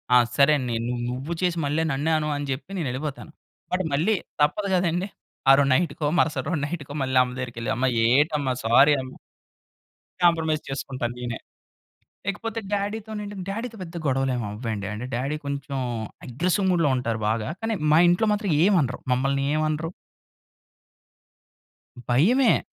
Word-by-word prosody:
ఆ! - - +9 0.2
సరేనే 140 -4 +3
నువ్వు 120 -1 -2
నువ్వు 135 +7 -4
చేసి 175 -1 +1
మళ్ళీ 150 +3 +1
నన్నే 145 +4 0
అను 150 0 -1 0.2
జెప్పి 140 +8 -5
నేనెళ్ళిపోతాను. 145 +2 -4 0.4
బట్ 185 - +1
మళ్ళీ 185 +10 +2 0.3
తప్పదు 200 +7 +1
గదండీ. 180 +2 0 0.4
ఆ - - +10
రోజు 140 - +3
నైటుకో, 155 0 0
మరుసటి 150 -5 +1
రోజు 160 - -1
నైటుకో 145 -3 -6
మళ్ళీ 130 0 0
అమ్మ 125 - -5
దగ్గరికెళ్ళి 120 -1 -4
"అమ్మా 130 +1 +2 0.2
ఏటమ్మా 145 0 +2
సారీ 135 +6 +6
అమ్మ" 130 - -8 1.1
కాంప్రమైజ్ 160 -3 +3
చేసుకుంటాను 130 -3 -3
నేనే. 120 -2 -4 0.9
ఇకపోతే 225 +2 -3
డ్యాడీ‌తోనేంటంటే 205 -1 -3
డ్యాడీ‌తో 225 +2 -4
పెద్ద 170 -1 -10
గొడవలు 135 -1 +1
ఏమి 120 -3 -2
అవ్వండి. 105 -2 -4
అంటే 110 +4 -5
డ్యాడీ 135 +5 -1
కొంచెం 140 -1 -4 0.5
అగ్రెసివ్ 175 - 0
మూడ్‌లో 165 -4 +3
ఉంటారు 115 -3 -2
బాగా. 110 -1 -1
కానీ 225 0 -1 0.2
మా - - +6
ఇంట్లో 175 +5 +2
మాత్రం 205 -4 -1
ఏమి 200 -2 +4
అనరు. 130 -2 -2
మమ్మల్ని 135 +2 0
ఏమి 155 0 +1
అనరు. 155 +2 -2 2.2
భయమే. 225 - +4
150 Hz, 140 wpm, -25 LUFS, 130-175 Hz, 2.2 s, ఆ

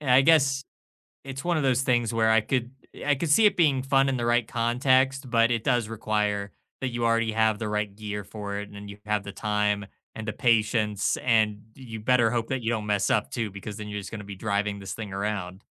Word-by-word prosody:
and 145 -4 -2
I 125 +1 +7
guess 140 -2 +4 0.6
it's 135 0 -7
one 175 -1 +1
of - - -1
those 130 -1 +2
things 120 -3 +1
where 110 -1 +3
I 110 0 +5
could 125 +1 -1 0.3
I 145 - +3
could 160 +4 -3
see 215 +9 +5
it 210 - +3
being 145 -6 +3
fun 135 0 +3
in 135 - 0
the 120 - -2
right 120 -1 +2
context, 130 +3 +1
but 115 -1 +3
it 115 -2 0
does 120 -3 +1
require 105 -2 -1 0.3
that 130 - -1
you 120 -1 -3
already 115 -1 +2
have 110 -1 +2
the 110 - -3
right 105 -1 -2
gear 105 -1 -5
for 100 0 -6
it 105 0 -6
and 100 0 -10
you 100 - -9
have 105 -1 0
the 100 - -8
time 105 -1 0 0.3
and 110 0 -7
the 105 - -2
patience 110 -3 +1
and 110 -4 +2
you 115 -4 -8
better 120 0 +3
hope 115 -1 -1
that 130 -2 -2
you 115 - 0
don't 110 -2 -2
mess 105 -1 +1
up 70 - +1
too 110 - -3
because 100 +2 -8
then 105 -1 -7
you're 105 0 -4
just 95 - -9
gonna 105 -2 -7
be 100 0 -8
driving 100 0 -1
this 95 -2 -6
thing 105 -3 -7
around. 100 -1 -3
110 Hz, 235 wpm, -26 LUFS, 105-125 Hz, 0.6 s, I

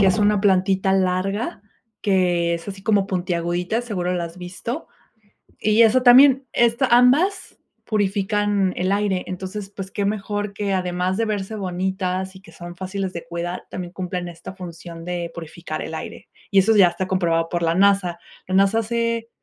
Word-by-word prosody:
que 195 - +5
es 185 +1 +3
una 205 -1 +3
plantita 190 -1 +2
larga 195 +3 -1 0.4
que 175 -4 +2
es 170 +2 -7
así 195 -1 -7
como 200 -2 +2
puntiagudita. 175 +3 -1
Seguro 180 -6 -2
la 175 -1 -1
has 170 +1 -9
visto. 185 - -6 0.7
Y 215 +2 +3
eso 230 +3 +4
también 260 +1 +7
esto 235 +3 +3
ambas 270 +12 +3 0.3
purifican 205 -1 +1
el 185 +2 0
aire. 200 -2 0
Entonces 190 +2 -6
pues 195 -1 -6
qué 200 - -2
mejor 205 0 -2
que 200 -1 -2
además 180 +1 -1
de 230 - +1
verse 210 0 -3
bonitas 190 0 -2
y - - -11
que 165 - -16
son 175 +1 -10
fáciles 190 +1 -4
de 170 - -6
cuidar, 175 +1 -4
también 180 -1 -6
cumplen 180 -1 -4
esta 170 +2 -9
función 170 -2 -9
de 175 -1 -3
purificar 165 +1 -7
el - - -5
aire. - - -8 0.2
Y 195 - +6
eso 220 +4 +4
ya 185 -3 +8
está 185 +2 -4
comprobado 165 -3 +1
por 175 -1 -2
la 165 0 +2
NASA. 190 -3 +3 0.3
La 185 - -4
NASA 195 +3 +4
hace 230 0 -1
190 Hz, 175 wpm, -22 LUFS, 180-210 Hz, 0.7 s, ya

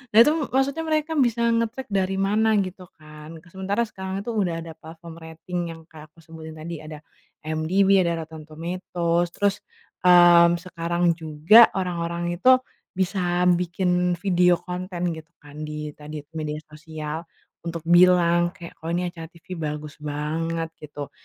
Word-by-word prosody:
nah, 225 - +9
itu 300 - +3 0.2
maksudnya 280 +4 +1
mereka 310 +1 0
bisa 235 -2 +2
ngecek 230 +1 -2
dari 195 -1 0
mana 210 +3 +2
gitu 185 -1 -9
kan. 155 +1 -12 0.2
Sementara 195 +5 -1
sekarang 190 -2 -6
itu 235 - -4
udah 175 -6 -1
ada 165 - -9
platform 165 +1 -11
rating 165 +2 -6 0.2
yang 160 - -15
kayak 155 -1 -12
aku 165 - -19
sebutin 160 -1 -10
tadi. 160 +1 -7
Ada 155 0 -10 0.4
IMDb, 185 +5 +2
ada 170 -2 0
Rotten 160 -1 -12
Tomatoes. 170 +1 -2
Terus, 200 -1 +1 0.4
mmm, 175 -1 +7
sekarang 170 -1 0
juga 160 +9 +6
orang-orang 175 -2 -2
itu 255 +6 +7 0.4
bisa 180 -1 0
bikin 180 0 0
video 180 -1 +3
konten 180 0 -4
gitu 160 +1 -9
kan 145 +1 -12
di 150 0 -5
tadi 150 0 -8
itu 150 - -48
media 150 -1 -3 0.2
sosial 155 +1 -7 0.4
untuk 165 -1 -5
bilang 175 0 +4
kayak, 170 -1 -12
"Kok 160 - -8
ini 180 0 -2
acara 165 -2 -9
TV 170 +1 -10
bagus 150 -1 -5
banget" 160 +3 -3
gitu. 145 -1 -8
170 Hz, 150 wpm, -24 LUFS, 160-185 Hz, 0.4 s, nah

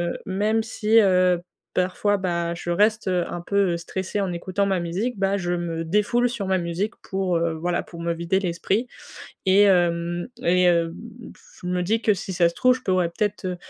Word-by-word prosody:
heu, - - -5
même 210 +4 0
si, 220 0 +2
heu, 180 -3 +3 0.3
parfois, 185 +3 +1
bah, 170 -2 -1
je 175 0 -6
reste 210 +5 +2
un 175 -1 -1
peu 195 -2 +1
stressée 190 +4 -4
en 190 -2 -1
écoutant 185 +3 -1
ma 190 -2 +1
musique, 195 +8 -2
bah, 195 +1 +1
je 175 -2 -2
me 170 -1 -3
défoule 210 +8 +1
sur 235 -5 -4
ma 190 -1 +1
musique 175 +5 -2 0.2
pour, 190 -3 0
heu, 165 -1 0
voilà 175 +2 -1
pour 170 - -12
me 170 0 -1
vider 170 +3 0
l'esprit, 195 +5 -1 0.6
et 190 +2 +6
hem, 175 -2 +2 0.2
et 180 +1 +4
heu, 170 -1 +2
b 235 +3 -11
j - - -22 0.2
je - - -6
me 180 0 0
dis 220 +6 0
que 215 - +4
si 190 0 -6
ça 170 -1 +4
se 170 - -15
trouve, 255 0 +4
je 255 - -13
pourrais 185 -4 +1
peut-être, 205 +2 -2
heu 180 -1 -3
185 Hz, 205 wpm, -23 LUFS, 175-205 Hz, 0.6 s, et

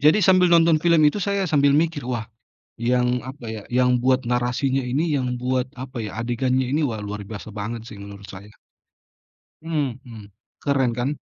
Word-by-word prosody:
jadi 150 +8 +5
sambil 185 -1 +5
nonton 165 -2 +5
film 170 -1 +4
itu 150 +8 +3
saya 200 0 0
sambil 145 -4 +3
mikir, 160 -1 +1
wah, 120 -3 -2 0.5
yang, 125 +1 +1
apa 130 -2 -9
ya, 110 -2 -5
yang 125 0 +3
buat 130 0 +1
narasinya 125 +2 0
ini, 145 +4 0
yang 130 -1 -1
buat 130 0 0
apa 130 -1 -8
ya, 100 - -6
adegannya 125 +2 0
ini, 150 +2 +1
wah 110 -5 -3
luar 105 0 -6
biasa 105 +1 -8
banget 110 +2 -5
sih 105 - -10
menurut 100 0 -10
saya. 100 +2 -11 1.1
Mhm. 125 -9 -4 0.3
Keren 135 -4 +1
kan? 125 +3 0
125 Hz, 170 wpm, -23 LUFS, 115-145 Hz, 1.1 s, jadi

